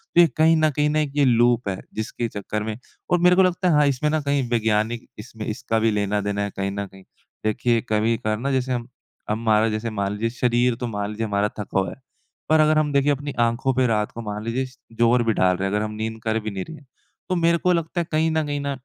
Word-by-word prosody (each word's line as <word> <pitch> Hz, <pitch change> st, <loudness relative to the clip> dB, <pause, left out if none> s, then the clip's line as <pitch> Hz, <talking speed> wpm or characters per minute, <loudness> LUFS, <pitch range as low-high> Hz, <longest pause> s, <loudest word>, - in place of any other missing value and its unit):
तो 175 Hz, -, +8 dB
ये 170 Hz, -, +6 dB
कहीं 160 Hz, +1 st, +5 dB
न 155 Hz, 0 st, +3 dB
कहीं 150 Hz, 0 st, +2 dB
न 150 Hz, -, -1 dB
एक 150 Hz, -2 st, 0 dB
ये 145 Hz, -1 st, +4 dB
लूप 120 Hz, -1 st, +3 dB
है। 95 Hz, -, -3 dB, 0.2 s
जिसके 110 Hz, +2 st, -3 dB
चक्कर 105 Hz, 0 st, -4 dB
में 110 Hz, 0 st, -4 dB, 0.3 s
और 180 Hz, -, +4 dB
मेरे 180 Hz, +1 st, +5 dB
को 190 Hz, -, +5 dB
लगता 180 Hz, 0 st, +1 dB
है -, -, +3 dB
हाँ, 150 Hz, 0 st, +5 dB
इसमें 140 Hz, +2 st, 0 dB
ना 155 Hz, 0 st, 0 dB
कहीं 140 Hz, -1 st, 0 dB
वैज्ञानिक 115 Hz, 0 st, 0 dB
इसमें 110 Hz, 0 st, -8 dB
इसका 115 Hz, 0 st, -1 dB
भी 110 Hz, 0 st, +2 dB
लेना 105 Hz, 0 st, 0 dB
देना 100 Hz, 0 st, -2 dB
है 100 Hz, -, -2 dB
कहीं 100 Hz, 0 st, -1 dB
न 100 Hz, 0 st, -3 dB
कहीं। 95 Hz, 0 st, -16 dB, 0.4 s
देखिए 115 Hz, +2 st, +1 dB
कभी-कभार 110 Hz, 0 st, +1 dB
ना 135 Hz, +3 st, -1 dB
जैसे 130 Hz, -1 st, 0 dB
हम 120 Hz, -1 st, -3 dB, 0.4 s
हमारा 110 Hz, 0 st, +2 dB
जैसे 110 Hz, +2 st, -2 dB
मान 100 Hz, -2 st, -2 dB
लीजिए 110 Hz, +3 st, -1 dB
शरीर 120 Hz, 0 st, +1 dB
तो 125 Hz, +1 st, -4 dB
मान 105 Hz, -2 st, -3 dB
लीजिए 110 Hz, +1 st, -3 dB
हमारा 100 Hz, -1 st, +1 dB
थका 100 Hz, -1 st, -1 dB
हुआ 95 Hz, -, -1 dB
है। -, -, -9 dB, 0.5 s
पर 155 Hz, 0 st, +5 dB
अगर 155 Hz, 0 st, +4 dB
हम 150 Hz, -1 st, +2 dB
देखिए 140 Hz, +1 st, +3 dB
अपनी 145 Hz, 0 st, -3 dB
आँखों 120 Hz, +3 st, +1 dB
पे 130 Hz, 0 st, +2 dB
रात 105 Hz, -2 st, 0 dB
को 115 Hz, -, -7 dB
मान 105 Hz, -1 st, -5 dB
लीजिए 120 Hz, +4 st, -1 dB
स 130 Hz, 0 st, -15 dB, 0.2 s
ज़ोर 120 Hz, +1 st, +4 dB
भी 115 Hz, -1 st, +1 dB
डाल 90 Hz, -2 st, +2 dB
रहे 95 Hz, -, -1 dB
हैं 100 Hz, -, -1 dB
अगर 105 Hz, -, 0 dB
हम 105 Hz, -, -5 dB
नींद 110 Hz, +1 st, -4 dB
कर 110 Hz, 0 st, 0 dB
भी 110 Hz, 0 st, -5 dB
नहीं 95 Hz, -2 st, -4 dB
रहे 160 Hz, -, -9 dB
हैं। 145 Hz, -, -18 dB, 0.4 s
तो 185 Hz, -, +1 dB
मेरे 170 Hz, -1 st, +3 dB
को 180 Hz, +2 st, +2 dB
लगता 170 Hz, +1 st, -1 dB
है 170 Hz, -, -5 dB
कहीं 160 Hz, +1 st, +2 dB
न 160 Hz, -1 st, 0 dB
कहीं 145 Hz, 0 st, -2 dB
न 140 Hz, -1 st, -2 dB
115 Hz, 265 wpm, -23 LUFS, 105-145 Hz, 0.5 s, तो